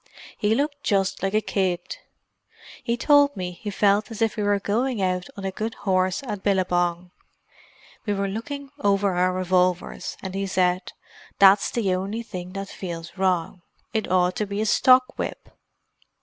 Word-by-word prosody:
He 215 +1 +1
looked 285 +2 -1
just 195 -3 0
like 195 +2 -1
a 215 - +3
kid. 185 -4 -2 0.9
He 235 0 -1
told 285 -1 +4
me 180 -1 -3
he 205 +4 -7
felt 205 +2 +2
as 225 - -8
if 225 -1 +2
he 215 - -4
were 205 0 +2
going 230 +4 -1
out 185 -1 -1
on 195 - -6
a 190 - -1
good 220 +4 -4
horse 185 +2 +1
at 210 -6 -5
Billabong. 180 -2 0 1.0
We 205 - +1
were 200 0 -1
looking 270 +7 -6
over 200 -4 +2
our 180 +1 +2
revolvers, 185 -1 0
and 190 -1 -5
he 195 0 -2
said, 180 -1 0 0.4
'That's 195 0 +6
the 205 -6 0
only 200 +5 -3
thing 180 -4 -7
that 195 0 -5
feels 170 -2 -7
wrong; 185 -2 0 0.3
it 220 -1 -1
ought 180 0 +3
to 210 - -1
be 200 +1 -4
a 215 - +1
stock 255 +2 +4
whip! - - -5
195 Hz, 170 wpm, -24 LUFS, 185-215 Hz, 1.0 s, That's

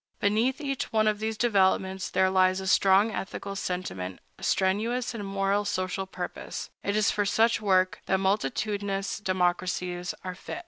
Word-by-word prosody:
Beneath 225 +7 +1
each 275 -3 -3
one 215 -1 +3
of 210 -1 +1
these 220 0 -2
developments 190 -4 +2
there 190 0 +2
lies 185 0 +3
a 190 - -5
strong 195 +3 +4
ethical 200 0 -5
sentiment, 95 - -4 0.2
a - - -13
strenuous 225 +7 +1
moral 195 -2 0
and 205 - -3
social 185 0 -2
purpose. 180 -1 -6
It 200 - -1
is 215 0 +3
for 205 - +1
such 225 +2 +2
work 185 -2 +2
that 190 - +3
multitudinous 200 +1 -1
democracies 180 -2 -1
are 185 0 -4
fit. 190 - -7
195 Hz, 155 wpm, -27 LUFS, 185-210 Hz, 0.2 s, strong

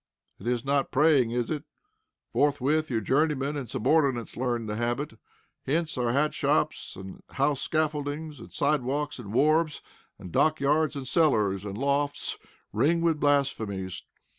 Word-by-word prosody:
It - - -8
is 125 +1 0
not 140 0 +1
praying, 140 -4 +4
is 120 +3 -2
it? 150 -2 -2 0.7
Forthwith, 145 +2 +2
your 115 -3 0
journeymen 145 +4 +1
and 135 -6 -5
subordinates 135 -3 +1
learn 120 -2 -1
the 105 -1 -3
habit. 120 +4 -2 0.5
Hence 160 +3 0
our 120 -2 0
hat 150 +4 +1
shops, - - 0
and 95 0 -9
house 140 +1 0
scaffoldings, 155 -1 -2
and - - -12
side 145 0 +1
walks, 145 +3 -2
and 105 -5 -8
wharves, 155 +5 +2 0.3
and 90 - -10
dockyards, 155 - +2
and 135 -2 -5
cellars, 105 - +2
and 100 0 -5
lofts 140 +2 -1 0.3
ring 165 +3 +2
with 165 -2 +2
blasphemies. 110 -11 0
140 Hz, 145 wpm, -27 LUFS, 120-150 Hz, 0.7 s, praying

